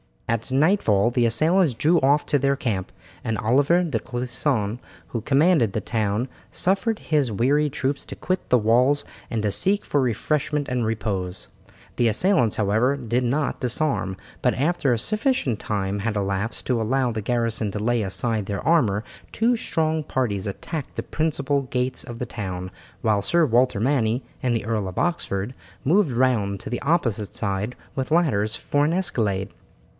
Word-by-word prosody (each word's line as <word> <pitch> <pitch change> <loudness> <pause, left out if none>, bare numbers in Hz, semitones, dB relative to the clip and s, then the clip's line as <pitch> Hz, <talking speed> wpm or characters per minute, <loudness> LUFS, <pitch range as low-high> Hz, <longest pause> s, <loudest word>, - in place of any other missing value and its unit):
At 115 +1 -1
nightfall 130 - +3
the 120 -1 +2
assailants 155 +6 +3
drew 155 +9 +3
off 140 +3 +3
to 145 - +2
their 140 +1 +2
camp, 105 -9 -2 0.3
and 115 -2 -1
Oliver 140 - +3
de 165 - -1
Clisson, 120 -2 -1 0.3
who 115 - -3
commanded 140 - +3
the 110 - -1
town, 110 +2 -1 0.2
suffered 200 +4 0
his 145 -6 0
weary 145 +8 +2
troops 140 0 -2
to - - -8
quit 185 0 -3
the 125 - +5
walls 125 +6 +3 0.3
and 110 -3 -2
to 105 - +1
seek 200 - +2
for 145 - +1
refreshment 145 +4 -1
and 125 -2 0
repose. 100 -4 -3 0.5
The 120 - +3
assailants, 120 - +2
however, 110 +6 +2
did 125 -1 -1
not 140 +4 0
disarm, 125 -6 0 0.3
but - - +2
after 150 -1 +1
a - - +1
sufficient 215 - 0
time 100 -1 -2
had 110 +2 -2
elapsed 100 +2 -2
to 125 -3 +1
allow 125 +2 +1
the 110 -1 -3
garrison 115 -1 0
to 105 - -4
lay 120 +2 +1
aside 105 +2 -1
their 100 -1 -4
armour 120 -11 +3 0.3
two 235 +2 +2
strong 160 -6 0
parties 110 -8 -2
attacked 145 - -5
the - - -3
principal 145 -3 0
gates 125 0 -2
of 120 -2 -8
the 125 - -2
town, 95 -5 -5 0.3
while 105 -3 +2
Sir 170 - +3
Walter 125 -4 +2
Manny 120 -2 +1 0.2
and 125 -2 +1
the 115 - -2
Earl 110 -3 -1
of 90 - -7
Oxford 125 - -1 0.3
moved 180 +4 +3
round 115 -6 +1
to - - -7
the 120 - -2
opposite 120 - 0
side 100 +3 -2 0.2
with 130 +1 -3
ladders 110 -11 +2
for 145 0 0
an 160 - +1
escalade. 105 - 0
125 Hz, 170 wpm, -24 LUFS, 110-145 Hz, 0.5 s, the